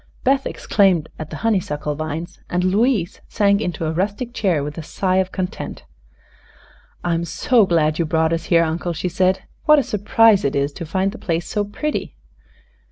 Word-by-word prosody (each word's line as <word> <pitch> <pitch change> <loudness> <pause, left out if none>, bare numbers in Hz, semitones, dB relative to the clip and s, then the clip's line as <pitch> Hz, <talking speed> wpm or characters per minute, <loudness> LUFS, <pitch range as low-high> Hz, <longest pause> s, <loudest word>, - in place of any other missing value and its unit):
Beth 270 +1 +2
exclaimed 185 -7 +2
at 155 -1 -6
the - - -7
honeysuckle 150 -9 0
vines 155 +3 -5
and 180 0 0
Louise 200 0 +1
sank 200 -1 +2
into 170 -5 -3
a 155 - 0
rustic 205 +8 -2
chair 180 - +1
with 150 +1 -5
a - - -4
sigh 185 +4 -1
of 190 -1 +1
content. 185 -1 -5 1.2
"I'm 170 -1 0
so 215 +6 +2
glad 155 -2 +2
you 170 - +2
brought 160 +1 +1
us 165 0 -2
here. 170 -1 +4
Uncle," 170 +2 -2
she 170 +3 -3
said. 185 +1 +1 0.2
"What 305 -1 +7
a 285 - +3
surprise 210 0 +3
it 140 - 0
is 140 +1 0
to 170 -1 -7
find 190 +4 0
the - - -10
place 170 -1 -2
so 210 - -1
pretty!" 300 +9 -4
180 Hz, 180 wpm, -20 LUFS, 160-205 Hz, 1.2 s, What